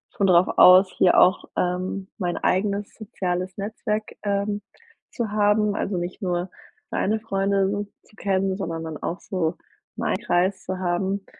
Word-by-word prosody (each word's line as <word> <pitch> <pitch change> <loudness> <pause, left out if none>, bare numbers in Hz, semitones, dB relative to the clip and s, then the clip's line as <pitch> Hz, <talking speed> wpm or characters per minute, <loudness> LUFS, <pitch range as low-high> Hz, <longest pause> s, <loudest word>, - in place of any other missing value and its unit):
schon 200 - +2
drauf 180 0 +5
aus 185 +1 +8
hier 180 - +5
auch, 185 - +4
ähm, 185 +2 -1
mein 175 -4 -2
eigenes 200 +1 0
soziales 185 -4 -4
Netzwerk, 215 +1 -2 0.2
ähm, 205 0 -1 0.5
zu 230 -4 -3
haben, 210 0 +2
also, 195 -3 -2
nicht 175 +3 -5
nur 180 0 -1 0.4
seine 220 +2 0
Freunde 195 -2 0
so 205 +1 -2 0.2
zu - - -24
kennen, 195 -2 0
sondern 165 -4 -4
dann 160 -2 -6
auch 175 - -4
so 170 -4 -2 0.4
meinen - - -1
Kreis 185 +2 0
zu 185 - -4
haben. 190 +2 -1
190 Hz, 155 wpm, -24 LUFS, 180-205 Hz, 0.5 s, aus